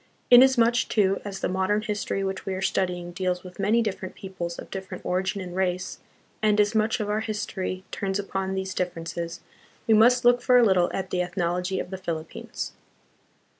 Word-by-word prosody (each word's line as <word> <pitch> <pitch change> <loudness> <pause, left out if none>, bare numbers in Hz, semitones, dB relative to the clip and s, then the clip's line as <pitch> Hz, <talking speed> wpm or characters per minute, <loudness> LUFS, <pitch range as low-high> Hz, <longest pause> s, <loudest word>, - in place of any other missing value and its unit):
Inasmuch, 245 -2 +6
too, 195 -3 +2
as 195 -2 -6
the - - +1
modern 190 +3 0
history 205 -2 -2
which 190 -1 -3
we 190 - -3
are 185 - -4
studying 180 -2 -1
deals 180 0 -2
with 180 0 -12
many 215 +4 +3
different 195 -3 -4
peoples 175 -3 -6
of - - -10
different 190 -1 -7
origin 190 +2 -1
and 180 -1 -7
race, 185 -1 -1 0.4
and 210 -1 +3
as 210 +1 +3
much 220 +2 +1
of 210 - -2
our 210 +1 0
history 210 -4 -3
turns 195 -1 -2
upon 195 -1 -3
these 190 0 -3
differences, 170 -1 -4 0.4
we 225 - +4
must 240 +3 +5
look 245 0 +5
for 250 -1 +5
a 245 - +6
little 185 -4 +3
at 190 -1 -4
the 180 - +1
ethnology 180 +1 -1
of 180 - -5
the 190 - -5
Philip 165 -3 -4
pines. - - -6
190 Hz, 190 wpm, -26 LUFS, 180-210 Hz, 0.4 s, Inasmuch